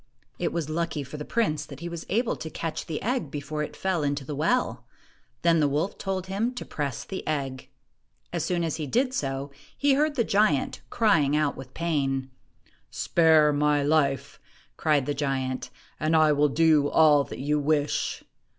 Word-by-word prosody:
It - - 0
was 170 -4 -2
lucky 160 -1 -2
for 140 +3 -8
the 150 - -6
prince 155 -11 0
that 140 -1 -10
he 170 - -5
was 170 -1 -7
able 230 +4 +1
to 160 - -7
catch 165 +1 -4
the 160 - -3
egg 245 - -1
before 150 +1 -4
it 150 - -5
fell 190 -4 -1
into 140 -1 -1
the 150 - -5
well. 240 - 0 0.6
Then 170 -1 +4
the 150 - +3
wolf 150 +7 -1
told 190 -2 -2
him 210 +6 -2
to - - -5
press 140 -5 -3
the 190 - -5
egg. 135 -4 -3 0.6
As - - -1
soon 175 -2 0
as 160 -2 -2
he 155 -3 -4
did 255 - +1
so, 135 - -3 0.3
he 285 -1 +3
heard 295 +2 +2
the 240 - +2
giant 200 -10 +1
crying 165 -11 +3
out 150 -2 +1
with 130 -1 -11
pain. 135 -5 -1 0.6
"Spare 160 -3 +4
my 145 0 +2
life," 140 -2 +1 0.4
cried 150 -4 +2
the 145 - -1
giant, 135 -3 -2 0.3
"and 155 +1 +1
I 155 -1 +5
will 150 0 +3
do 155 -1 +4
all 150 -3 +5
that - - -8
you 150 +3 0
wish 145 0 0
155 Hz, 185 wpm, -26 LUFS, 145-170 Hz, 0.6 s, I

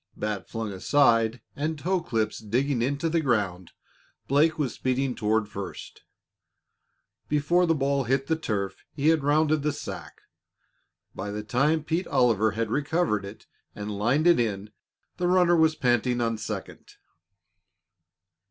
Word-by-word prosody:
Bat 105 -2 -4
flung 115 -2 -4
aside 115 +1 +2
and 155 +2 -2
toe 180 +4 0
clips 110 -9 -2
digging 120 +4 0
into 140 +6 0
the 165 0 +1
ground, 100 - -1 0.6
Blake 155 +4 +3
was 145 -5 -1
speeding 130 0 -1
toward 110 -2 0
first. 100 -2 -8 1.3
Before 170 +5 +2
the 165 - +3
ball 140 -1 0
hit 135 +3 +1
the 160 - +1
turf 105 -11 -3
he 145 +1 +2
had 160 -3 +2
rounded 155 +1 +2
the 150 +1 0
sack. - - -8 0.9
By 95 +2 -5
the 105 +1 -4
time 140 +7 +1
Pete 165 +3 -1
Oliver 110 -4 +2
had 110 0 -2
recovered 145 - 0
it 100 +3 -11 0.3
and 105 0 -5
lined 125 +10 +1
it 175 -4 +5
in, 105 -3 -2 0.5
the 175 0 0
runner 180 -1 +4
was 160 -1 +3
panting 125 -2 +1
on 115 -2 -1
second. 105 -3 -7
130 Hz, 145 wpm, -26 LUFS, 110-155 Hz, 1.3 s, it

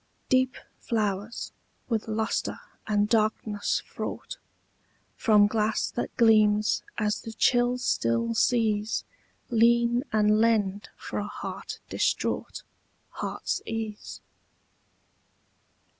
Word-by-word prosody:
Deep 255 -1 +3 0.2
flowers, 210 -1 -2 0.4
with 225 -3 -1
lustre 220 +1 -1 0.3
and 210 -1 +2
darkness 215 -1 0
fraught, - - -6 0.8
From 210 -3 +5
glass 215 0 0
that 240 - -4
gleams 215 -2 +4 0.2
as 215 -1 0
the 225 - -8
chill 245 +2 +3
still 115 - 0
seas 220 - +1 0.5
Lean 235 +1 +4
and 215 0 +3
lend 210 -3 +1
for - - -5
a - - -3
heart - - -6
distraught - - -1 0.5
Heart's - - -3
ease. 220 -2 -5
220 Hz, 95 wpm, -27 LUFS, 210-230 Hz, 0.8 s, From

